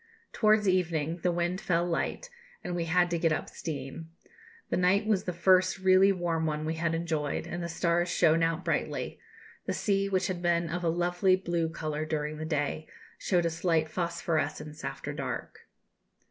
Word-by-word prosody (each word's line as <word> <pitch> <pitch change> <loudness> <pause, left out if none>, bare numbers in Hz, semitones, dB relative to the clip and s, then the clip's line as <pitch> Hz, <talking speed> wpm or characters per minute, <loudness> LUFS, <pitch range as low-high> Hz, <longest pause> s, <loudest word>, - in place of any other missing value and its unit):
Towards 215 -1 +3
evening 170 -3 +1
the 175 +1 0
wind 175 +2 -1
fell 170 -1 +1
light, 175 - -2 0.3
and 175 - -3
we 170 -1 -1
had 175 +1 +2
to 170 - 0
get 165 -1 +2
up - - -1
steam. 155 +1 -6 0.6
The - - +2
night 185 +4 +3
was 210 -3 +1
the 180 - -1
first 185 +2 +3
really 190 +1 +5
warm 170 -3 -1
one 155 0 -2
we 160 - -1
had 165 0 -1
enjoyed, 160 -3 -2
and 175 - -5
the 170 - -4
stars 170 +1 +1
shone 165 -1 +3
out 165 +2 0
brightly; - - -2 0.5
the - - 0
sea, 195 -1 0
which 190 -1 +1
had 180 -2 -3
been 170 -1 +1
of 175 +2 -3
a 170 - +2
lovely 175 +2 +2
blue 170 -3 -1
colour 155 -1 -3
during 155 -1 -3
the 155 - -4
day, 155 0 -2 0.3
showed 175 -3 +1
a 165 - +1
slight 165 -1 +1
phosphorescence 165 -2 -2
after - - -5
dark." - - -6
170 Hz, 180 wpm, -29 LUFS, 160-180 Hz, 0.6 s, really